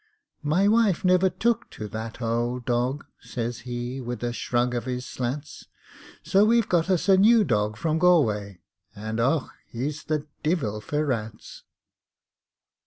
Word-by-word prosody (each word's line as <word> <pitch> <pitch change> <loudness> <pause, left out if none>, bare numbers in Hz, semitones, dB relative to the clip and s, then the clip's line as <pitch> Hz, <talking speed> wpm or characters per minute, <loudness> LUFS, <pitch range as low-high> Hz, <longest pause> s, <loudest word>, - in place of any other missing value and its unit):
"My 160 +7 +2
wife 210 -5 +3
never 185 +1 +4
took 230 +4 0
to 105 - -7
that 110 +2 -6
ould 120 +2 -1
dog," 125 +3 -1
Says 120 -1 -4
he, 120 +2 -4
wid 120 0 -5
a 120 0 -1
shrug 120 +1 0
av 120 0 -2
his 125 0 -3
slats, 135 +4 -5 0.6
"So 195 +2 +4
we've 230 0 +3
got 175 0 +1
us 185 -1 +1
a 190 -1 +6
new 220 +3 +6
dog 105 - 0
from 160 +6 0
Galway, 110 - +2 0.4
_And 110 +2 -4
och, 135 +5 +1 0.2
he's 140 +6 -4
the 150 -1 -1 0.2
divil 140 - -1
for 150 +6 -1
rats!" 110 -5 -5
130 Hz, 150 wpm, -25 LUFS, 115-175 Hz, 0.6 s, a